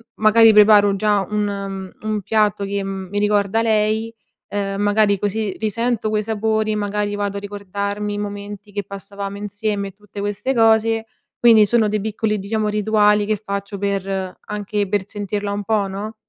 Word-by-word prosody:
magari, 220 +1 +6
preparo 205 -1 +6
già 205 0 +2
un 200 -2 -3
un 215 -1 -2
piatto 210 0 +1
che, 200 0 -2
mhmm, 195 -1 -5
mi 205 +1 -2
ricorda 205 +1 +2
lei, 220 +1 +1 0.4
uhm, 200 -1 -2
magari 205 0 +3
così 205 -1 -2
risento 225 +1 -1
quei 215 0 0
sapori, 220 0 0
magari, 205 0 -1
vado 200 -1 -2
a - - -2
ricordarmi 205 +1 -4
i - - -3
momenti 205 0 -7
che 205 0 -3
passavamo 200 +1 -7
insieme, 205 0 -3
e - - -13
tutte 205 +1 -12
queste 205 +6 -2
cose. 225 -1 +3 0.3
Quindi, 225 -3 +7
sono 225 0 +2
dei 210 0 0
piccoli, 215 0 -1
diciamo, 210 +2 -1
rituali 210 0 +3
che 215 0 0
faccio 200 -1 -4
per 195 -2 -2
anche 205 -1 -3
per 200 0 -1
sentirla 205 0 -3
un 205 0 -3
po', 210 -2 +1
no? 205 +3 -6
205 Hz, 165 wpm, -20 LUFS, 200-215 Hz, 0.4 s, Quindi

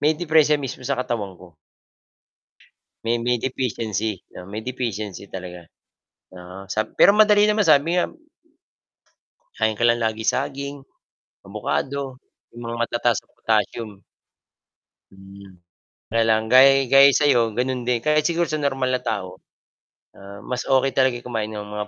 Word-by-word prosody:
may 150 +2 +3
deperensiya 155 -2 +2
mismo 130 -1 -7
sa 125 - -2
katawan 115 -6 -3
ko. 90 -3 -16 1.5
May 115 +1 0
may 120 +1 0
deficiency 110 -5 -3 0.2
may 105 +3 -6
deficiency 110 -6 -5
talaga, 90 -3 -9 0.7
oo, 90 +2 -11
sab 110 +3 -4
pero 200 - +7
madali 210 -1 +5
naman 210 0 +2
sabi 155 0 +3
nga 180 - 0 1.5
kakain 110 -1 0
ka 120 - +2
lang 120 0 +2
lagi 110 0 -2
saging, 140 0 -4 0.7
abukado 135 -1 -4 0.3
yung 120 - -11
mga 115 - -4
matataas 120 -1 0
sa - - -35
potassium. 110 0 -1 1.2
Mhm, 95 -1 -15 0.5
kaya 115 +1 +2
lang 110 0 +3
gay 135 +1 +6
gaya 135 0 +8
sa'yo 145 -5 +4 0.2
ganun 125 0 -1
din 125 -1 +1
kahit 150 0 +3
siguro 170 0 0
sa 155 -1 -2
normal 135 -2 -1
na 125 - -1
tao, 95 -4 -5 0.8
ah, 100 +1 -11
mas 125 -1 -4
okey 135 0 +2
talaga 130 -2 +2
kumain 110 -3 -3
ng 105 -1 -6
mga 105 0 -6
120 Hz, 140 wpm, -22 LUFS, 105-135 Hz, 1.5 s, gaya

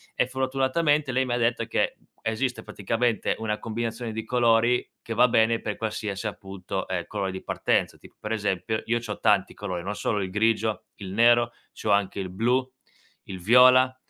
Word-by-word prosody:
e - - +1
fortunatamente 135 +3 +1
lei 130 +1 +1
mi 125 - -2
ha - - +1
detto 115 -1 +1
che - - 0 0.3
esiste 115 +1 -1
praticamente 115 +3 -1
una 110 -1 -2
combinazione 115 +1 -4
di 110 0 -4
colori 120 0 +2
che 115 - -5
va 125 +2 +5
bene 115 -1 +3
per 105 - -4
qualsiasi, 105 -1 -3
appunto, 95 -2 -5
ehm, 90 -2 -3
colore 100 -2 -3
di 95 - -7
partenza, - - 0
tipo - - -17
per 105 - -6
esempio 105 0 -1
io 120 +1 +1
c'ho 110 -3 -6
tanti 100 -2 +2
colori, 90 -4 -5
non 100 +3 -4
solo 105 0 -1
il 95 - -3
grigio, 110 +1 0
il 95 -2 -8
nero, 120 +2 +4 0.3
c'ho 110 - 0
anche 100 -1 +1
il 95 -1 -4
blu, 125 +7 0 0.5
il 95 -1 -8
viola, 125 +5 +6
110 Hz, 180 wpm, -26 LUFS, 100-120 Hz, 0.5 s, viola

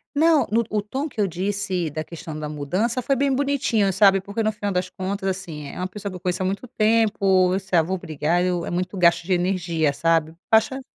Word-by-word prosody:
Não, 315 0 +4
no 230 +2 +3
o 210 -1 +1
tom 265 +8 -4
que 255 -7 -4
eu 200 - +2
disse 185 -1 -2
da 155 +2 -4
questão 160 -1 -8
da 150 -1 -5
mudança 185 - -1
foi 275 +3 +1
bem 275 +1 +1
bonitinho, 255 -8 +1
sabe, 195 0 +5
porque 200 +4 -4
no 215 0 +1
final 205 -1 -3
das 180 0 -1
contas 195 +1 -3
assim, 170 -6 -5
é - - -9
é - - -9
uma 185 +1 -2
pessoa 200 +1 -6
que - - -8
eu - - -7
conheço 180 0 -2
há - - 0
muito 200 +6 -3
tempo, 210 -5 +2
isso 190 -1 -5
é: - - +6
"Ah, 165 - +5
vou 190 +4 -2
brigar?". 160 +1 -1
Eu 180 -2 -1
é - - -5
muito 180 +2 -2
gasto 170 -2 +4
de 185 +2 0
energia, 175 -4 0
sabe, 165 0 +1 0.2
baixa 225 +5 +3
190 Hz, 240 wpm, -23 LUFS, 175-215 Hz, 0.2 s, é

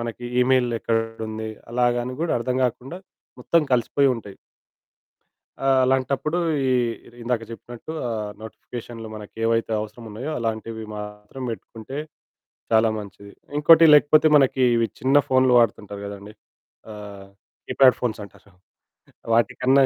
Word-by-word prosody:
మనకి 115 +1 -6 0.2
ఈమెయిల్ 125 -1 +3
ఎక్కడుంది, 110 -1 -3 0.2
అలాగ 120 0 +2
అని 125 0 -5
గూడా 170 - 0
అర్థం 125 +1 -1
గాకుండా 130 +8 -4 0.4
మొత్తం 170 -2 +2
కలిసిపోయుంటయి. 120 -4 +1 1.3
ఆహ్, 135 -1 +4
అలాంటప్పుడు 135 +5 0 0.3
ఈ - - +2 0.5
ఇందాక 115 -1 -1
చెప్పినట్టు 120 +5 -9 0.2
ఆహ్, 105 -3 -3
నోటిఫికేషన్లు 115 +1 -9
మనకి 105 -1 -10
ఏవైతే 115 0 +1
అవసరమున్నాయో, 115 +5 -7
అలాంటివి 110 -1 -4
మాత్రం 105 +5 -8
పెట్టుకుంటే 115 +3 -8 0.7
చాలా 110 0 +4
మంచిది. 100 -1 -10 0.3
ఇంకోటి 165 +2 +7
లేకపోతే 150 +1 +6
మనకి 135 -2 +3
ఇవి 115 -1 +2
చిన్న 135 +2 +3
ఫోన్లు 130 -1 +3
వాడుతుంటారు 105 -3 -1
కదండీ. 100 +1 -9 0.6
ఆహ్, 100 -2 -10 0.4
కీప్యాడ్ 130 -3 +5
ఫోన్స్ 110 -3 -2
అంటారు. 100 0 -16 0.8
వాటికన్నా 130 +4 +3
115 Hz, 115 wpm, -23 LUFS, 110-130 Hz, 1.3 s, ఇంకోటి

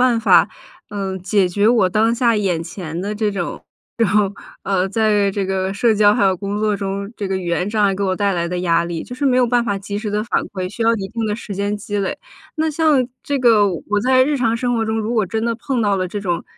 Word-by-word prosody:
办 225 - -1
法， - - +5 0.4
呃， 195 -2 -4
解 185 +1 +1
决 205 +4 +2
我 225 -6 +4
当 220 +4 +2
下 235 -1 +2
眼 185 -6 0
前 170 -1 -6
的 205 +3 -3
这 210 -1 0
种 - - -8
这 195 - -2
种， 175 - -6 1.0
呃， 190 -1 0
在 210 -1 +2
这 195 0 -2
个 190 0 -1
社 220 +3 +2
交 205 0 +5
还 225 - +1
有 190 -1 +3
工 200 +3 -4
作 215 -1 +1
中， 200 0 -4
这 205 - -3
个 190 0 -1
语 180 - -6
言 175 +2 0
障 215 -1 +1
碍 195 -1 +2
给 200 - -3
我 190 -1 +1
带 200 0 0
来 170 -1 -1
的 180 +1 -3
压 170 -1 +2
力， 170 -1 -4
就 245 - -8
是 255 - -3
没 255 -2 +3
有 250 - +4
办 240 0 +1
法 200 -3 -1
及 200 +1 -6
时 210 0 -4
地 210 +1 0
反 235 - 0
馈， 185 -2 -4
需 230 - -4
要 225 +1 +4
一 195 -2 -5
定 230 +1 -3
的 210 - -1
时 210 -2 -7
间 200 +1 -1
积 205 0 -5
累。 195 - -2 0.4
那 315 0 +1
像 300 -4 +2 0.2
这 285 -1 -1
个 225 -5 +5
我 200 +3 -2
在 255 0 +5
日 290 +2 +1
常 230 -4 +1
生 245 +1 -1
活 225 - 0
中， 220 0 -1
如 220 +2 -2
果 220 -3 +2
真 220 +4 -3
的 235 0 0
碰 250 +2 -2
到 205 -3 +2
了 185 -1 -1
这 205 +3 -5
种， 175 -4 -2
205 Hz, 285 characters per minute, -19 LUFS, 190-230 Hz, 1.0 s, 法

